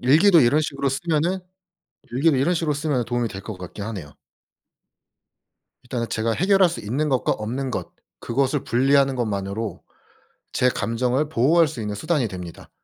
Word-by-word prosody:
일기도 165 +8 +6
이런 140 +4 +4
식으로 140 -2 -1
쓰면은 160 +5 0 0.7
일기를 140 +2 +3
이런 145 +7 +2
식으로 160 -3 0
쓰면 145 -4 -1
도움이 120 0 -1
될 95 -2 -8
것 110 0 -7
같긴 95 +3 -7
하네요. 95 -10 -6 1.7
일단은 120 -2 -4
제가 110 +1 -1
해결할 190 - +4
수 170 - -5
있는 135 +9 -1
것과 130 -3 +1
없는 125 +5 -3
것 - - -4 0.3
그것을 135 +3 0
분리하는 135 +2 +3
것만으로 105 -2 -3 0.7
제 125 - +3
감정을 125 +5 0
보호할 160 +5 +3
수 130 - -7
있는 105 -1 -3
수단이 150 +1 0
됩니다. 90 -4 -9
130 Hz, 345 characters per minute, -23 LUFS, 115-150 Hz, 1.7 s, 일기도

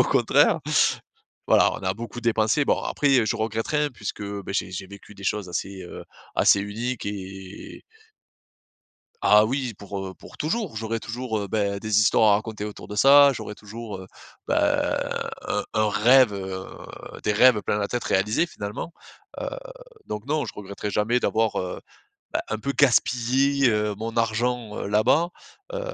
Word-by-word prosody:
au - - +8
contraire. - - +3 0.9
Voilà, - - +5
on - - -5
a 95 - 0
beaucoup 115 +3 -7
dépensé. 115 +4 +2
Bon - - +2
après, 145 - 0
heu, 110 - +1
je 115 - 0
regrette 110 0 -2
rien 150 -1 +1
puisque, 105 -2 -6
beh 100 -1 -5
j'ai 95 - -1
j'ai 95 +1 -6
vécu 100 +1 -13
des 100 - -13
choses 100 -3 -1
assez, 95 +2 -4
heu, 90 - -9 0.3
assez 100 - +5
uniques 115 +4 -4
et 95 -1 -8 1.4
Ah 105 +1 +6
oui! 125 -2 -2
Pour, 100 0 -7
heu, 95 - -9
pour - - -14
toujours. 170 - -2
J'aurai 115 +1 -3
toujours, 115 -1 -4
heu, 100 - -3
beh 100 -1 0
des 110 -1 +2
histoires 105 0 +5
à - - +6
raconter 110 -1 -5
autour 105 - -8
de 105 - -6
ça, 140 +4 +7
j'aurai 110 -4 -6
toujours, 110 0 -8
heu, 95 - -10 0.4
beh, - - +2 0.9
un - - -2
un 110 0 +2
rêve, 120 +3 +5
heu 95 -1 -5 0.6
des 105 - +1
rêves 110 +1 +5
plein 105 - -1
la 100 - -1
tête 120 - -3
réalisés, 105 - +1
finalement. 105 +3 -6 0.5
Heu, - - -2 0.6
donc 105 +2 -5
non, 150 +1 0
je - - -7
regretterai 100 0 -6
jamais 115 +5 +1
d'avoir, 110 -2 0
heu, 90 -1 -4 0.5
bah, - - 0
un 110 - -1
peu 140 +6 -3
«gaspillé» 130 +1 +3
heu, 105 -1 0
mon 115 +3 -5
argent, 115 0 0
heu, - - -4
là-bas, 110 +11 +3 0.4
heu, - - -2
110 Hz, 175 wpm, -24 LUFS, 100-120 Hz, 1.4 s, au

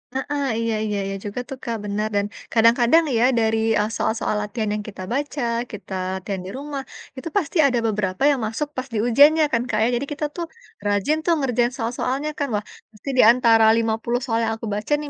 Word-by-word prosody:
Mhm, 285 +1 -2
iya 230 -1 0
iya 210 -1 -2
iya 195 - -3
juga 205 +4 -4
tuh 270 - -6
Kak, 230 -1 -2
benar, 210 +1 -1
dan 200 0 +2 0.3
kadang-kadang 235 +7 +5
ya, 230 - +3 0.2
dari, 225 0 +2 0.2
eee, 210 - 0
soal-soal 220 -1 -1
latihan 215 +1 -3
yang 210 - -4
kita 195 -2 -8
baca, 285 +1 -2 0.3
kita 205 -2 -8 0.2
latihan 190 0 -4
di 190 - -6
rumah, 280 -1 -5 0.3
itu 295 +6 -5
pasti 350 -1 -1
ada 245 -3 +1
beberapa 200 0 -1
yang 275 - 0
masuk 280 +7 -3
pas 255 +1 -3
di - - -1
ujiannya 295 +6 +6
kan 230 - +3
Kak 215 - 0
ya. 225 - +3
Jadi 250 +4 -2
kita 300 +1 -3
tuh 345 - -3 0.4
rajin 205 +10 +1
tuh 345 - +4
ngerjain 245 -3 +1
soal-soalnya 255 +4 -2
kan. 285 - 0
Wah, 205 - -1 0.3
pasti 215 +6 -9
di - - +8
antara 230 -2 +4
50 230 +1 0
soal 230 -2 0
yang 225 - 0
aku 225 - -6
baca 210 +7 -5
nih, 295 - -6
230 Hz, 205 wpm, -22 LUFS, 215-275 Hz, 0.4 s, di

